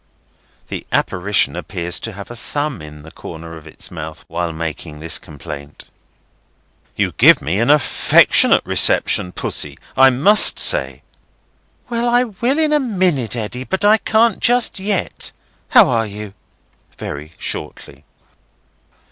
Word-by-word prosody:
The - - -6
apparition 95 +3 0
appears 85 0 -4
to 115 - -6
have 100 +3 -10
a - - -8
thumb 145 - -4
in 75 -1 -12
the 80 - -13
corner 85 -1 -10
of 80 -1 -13
its 75 - -9
mouth 80 -1 -8
while 85 0 -3
making 80 -1 -7
this 80 +1 0
complaint. 70 0 -11 1.0
"You - - -1
give - - +7
me 85 +8 -2
an 120 - +1
affectionate 150 -2 +4
reception, 90 - +2
Pussy, - - -1 0.2
I 135 0 +6
must 150 +12 +5
say." - - +3 0.8
"Well, 240 0 -1
I 245 +1 +3
will 240 +5 -2
in 310 -1 +1
a 300 - +3
minute, 185 - 0
Eddy, 120 +2 -5
but 190 +8 -2
I 215 +1 +5
can't 220 0 +1
just 245 -4 +2
yet. 195 -1 -3 0.4
How - - +6
are 115 -1 0
you?" 105 -1 -9 0.6
(very 75 +3 -8
shortly.) - - -6
115 Hz, 140 wpm, -17 LUFS, -, 1.0 s, give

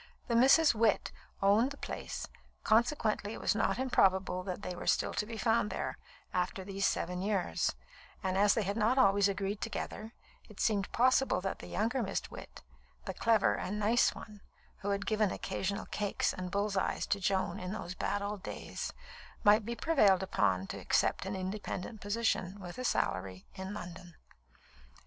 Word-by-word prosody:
The 235 - 0
Misses 275 +5 +6
Witt 220 -2 +2 0.3
owned 210 +6 +4
the 280 - -9
place, - - -5 0.4
consequently 220 -2 +2
it - - -7
was - - +2
not 215 - +1
improbable 190 -8 +2
that 185 +1 -5
they 180 - -4
were - - -7
still - - +2
to 210 - -1
be 230 0 -6
found 225 -2 +2
there, - - -4 0.3
after 180 +1 -1
these 195 0 0
seven 180 +1 -2
years; 200 -2 0 0.5
and 190 -1 0
as 205 +1 +4
they 225 - +1
had 200 +3 -2
not 230 +4 +2
always 200 -4 +5
agreed 200 +1 -2
together, 225 0 -5 0.4
it 215 - -14
seemed 200 -3 +1
possible 255 +2 +3
that 195 0 -3
the - - -9
younger 240 +5 0
Miss 195 - -3
Witt - - -10 0.4
(the - - -3
clever 225 -1 +3
and 205 +3 -3
nice 215 +3 +3
one, 210 -2 -11 0.4
who 200 - -3
had 200 0 -1
given 215 -2 +2
occasional 195 +2 -3
cakes 205 -1 -1
and 185 -1 -5
bulls' 200 +2 -1
eyes - - 0
to 200 - 0
Joan 190 -1 0
in 180 0 -5
those 195 -4 -5
bad 205 +2 -2
old 205 -1 -4
days) - - -5 0.5
might 210 +1 +5
be 235 - -2
prevailed 205 - +4
upon 95 - +1
to - - -5
accept - - +1
an 195 - -3
independent 190 +2 -5
position, 205 -3 -1
with 180 +3 -8
a - - -3
salary, 95 - -1
in 190 +2 -6
London. 175 -3 -9
205 Hz, 175 wpm, -32 LUFS, 190-220 Hz, 0.5 s, Misses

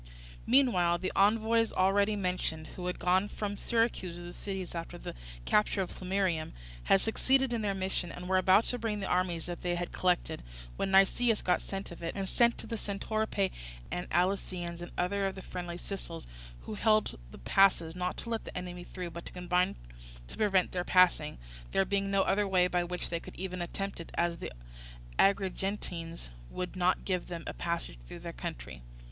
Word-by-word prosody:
Meanwhile 210 -10 +4
the 185 +2 -2
envoys, 225 +3 +4
already 200 +3 +3
mentioned, 180 -5 -2
who 180 -1 -4
had 180 - -2
gone 185 +3 +3
from 205 0 -3
Syracuse 225 -6 0
to 175 - -8
the 175 0 -8
cities 190 -3 -5
after 170 +1 -5
the - - -6 0.3
capture 210 -1 +3
of 180 - -7
Plemmyrium, 185 -4 -1 0.3
had 195 - +5
succeeded 265 +3 +2
in 230 - 0
their 200 -2 0
mission, 190 -2 -2
and 180 0 -7
were 185 0 +4
about 190 +3 +6
to 245 - -1
bring 215 -2 -1
the 195 - -3
army 180 -2 +1
that 175 +1 -6
they 175 -1 0
had 175 0 -3
collected, 180 - +1 0.3
when - - -1
Nicias 205 +4 +4
got 180 - +2
scent 195 -1 -5
of 170 - -10
it, 165 - -3
and 195 -1 -2
sent 235 +4 +3
to - - -7
the 225 0 -3
Centoripae 205 -1 -1 0.4
and 180 - -3
Alicyaeans 175 -1 0
and 175 - -7
other 195 +2 +1
of 195 - -4
the 190 - -8
friendly 175 -1 -5
Sicels, 175 -3 -6 0.4
who - - -6
held 215 - +2
the - - -11
passes, 170 - +3
not 180 0 -2
to 235 - -6
let 225 - -1
the - - -7
enemy 180 -1 -5
through, 180 -1 -6
but 170 +1 -7
to - - -8
combine 180 0 +1 0.5
to - - -9
prevent 195 -4 +3
their 180 -1 -1
passing, 175 -5 +4 0.4
there 195 - +4
being 195 +1 0
no 195 -1 +3
other 205 0 +2
way 185 -2 +4
by 180 -1 +1
which 180 +1 -3
they 170 - 0
could - - -11
even 185 -1 -4
attempt 195 +3 -4
it, 170 - -8
as 170 0 +1
the - - -6 0.7
Agrigentines 190 - 0 0.2
would 180 0 -4
not 185 0 +2
give 185 -2 -1
them 170 -2 -5
a - - -4
passage - - -3
through - - -8
their - - -7
country. - - -6
185 Hz, 195 wpm, -31 LUFS, 175-200 Hz, 0.7 s, about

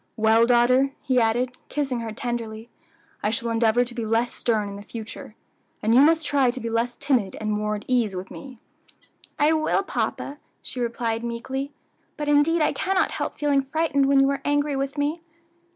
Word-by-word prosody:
Well, 225 +1 +4
daughter," 255 +3 +4
he 255 -2 +2
added, 240 +3 +1 0.2
kissing 270 -4 -1
her 230 -1 -4
tenderly, 230 -2 -5 0.5
"I 210 - +1
shall 235 +1 -2
endeavor 230 +1 +3
to 245 - -8
be 235 -1 -4
less 225 +2 0
stern 220 -3 0
in 200 0 -7
future, 220 0 -8 0.5
and 220 +2 +3
you 255 - +7
must 320 +1 +4
try 275 -4 +3
to 255 +2 -3
be 230 -2 -4
less 235 +1 -1
timid 255 -9 0
and 215 0 -2
more 210 0 -1
at 205 - -8
your 255 -1 +3
ease 210 -5 -2
with 185 +1 -6
me." 265 -3 -10 0.8
"I 300 +2 +4
will, 315 +5 +1
papa," 290 -6 -3 0.2
she 255 - -4
replied 235 -1 -2
meekly; 260 +4 -4 0.5
"but 295 -1 -3
indeed 295 +3 +4
I 300 - +2
cannot 385 -1 +1
help - - -4
feeling 290 -2 +2
frightened 280 0 +1
when 275 0 +4
you 270 0 +4
are 275 -1 -3
angry 290 0 +1
with 275 +1 -3
me." 295 +3 -1
245 Hz, 190 wpm, -24 LUFS, 225-280 Hz, 0.8 s, you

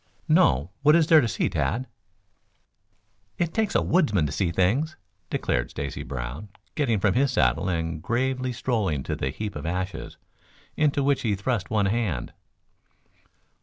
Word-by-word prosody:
"No. 70 +8 +3
What 150 +2 +6
is 170 -2 +5
there 160 -1 +6
to 120 - 0
see, 90 - 0
Tad?" 125 +3 -1 1.5
"It 170 -2 -1
takes 220 -2 0
a - - +3
woodsman 140 - +2
to 70 - -3
see 95 -4 0
things," 115 - +1 0.3
declared - - -1
Stacy 70 -1 -5
Brown, 65 - -6 0.2
getting 120 -9 +1
from 100 0 +2
his 135 +2 +2
saddle 95 - +2
and 80 -2 -2
gravely 130 +3 -1
strolling 105 - -1
to - - -3
the 65 - -2
heap 105 +8 -5
of 75 +2 -5
ashes, 90 -1 -4 0.6
into 145 -2 +2
which 140 0 +2
he 105 -4 0
thrust 100 0 -2
one 105 -2 +2
hand. 100 - -1
105 Hz, 155 wpm, -25 LUFS, 85-130 Hz, 1.5 s, What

